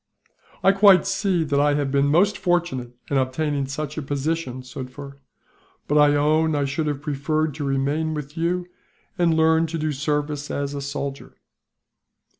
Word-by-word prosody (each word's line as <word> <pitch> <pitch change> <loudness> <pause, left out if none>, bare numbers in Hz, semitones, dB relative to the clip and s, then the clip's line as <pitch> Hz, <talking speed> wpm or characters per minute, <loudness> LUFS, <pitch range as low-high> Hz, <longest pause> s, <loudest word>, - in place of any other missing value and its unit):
"I 195 - +6
quite 195 -1 +6
see 195 -3 0
that 145 -2 0
I 145 0 +3
have 145 -2 -1
been 140 0 +2
most 180 +8 +3
fortunate 170 -10 -1 0.2
in 140 - +2
obtaining 140 +2 -1
such 150 +2 -4
a - - -4
position, 140 -2 -3
Sufder; 140 +2 -9 0.7
but 145 - 0
I 145 0 +5
own 155 +2 +2
I 145 -1 +1
should 145 +3 -2
have 145 -1 -3
preferred 155 +1 -1
to 150 - -5
remain 140 +3 -1
with 150 0 -7
you, 175 +2 -1 0.5
and 165 -2 +3
learn 160 +1 +3
to 165 +1 -4
do 155 -1 -1
service 145 +1 -2
as 140 0 -3
a 140 - -4
soldier." 140 0 -5
150 Hz, 165 wpm, -23 LUFS, 140-160 Hz, 0.7 s, I